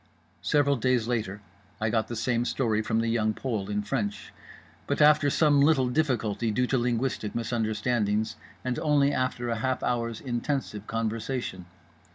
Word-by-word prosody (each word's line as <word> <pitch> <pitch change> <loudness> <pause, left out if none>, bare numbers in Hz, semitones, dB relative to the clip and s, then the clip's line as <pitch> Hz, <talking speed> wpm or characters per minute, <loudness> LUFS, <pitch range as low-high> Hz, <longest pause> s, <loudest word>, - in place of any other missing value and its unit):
Several 140 -1 +2
days 125 -1 +1
later 105 -4 -2 0.4
I 110 0 0
got 110 -2 +1
the 120 - -5
same 115 +1 0
story 115 -4 0
from 110 +1 0
The 115 - -1
Young 110 -2 +1
Pole 110 -7 -3
in 105 0 -1
French; 105 -4 -3 0.5
but - - -1
after 150 -1 +6
some 145 -1 +4
little 140 -4 +4
difficulty 120 -6 0
due 125 +4 +1
to 130 - +1
linguistic 120 -2 -1
misunderstandings, 110 -2 0 0.3
and 125 -2 -1
only 145 -2 +3
after 130 -2 -1
a 115 - -1
half 130 +2 -1
hour's 115 -2 -1
intensive 120 -4 -3
conversation. 115 -3 -3
120 Hz, 155 wpm, -27 LUFS, 110-130 Hz, 0.5 s, after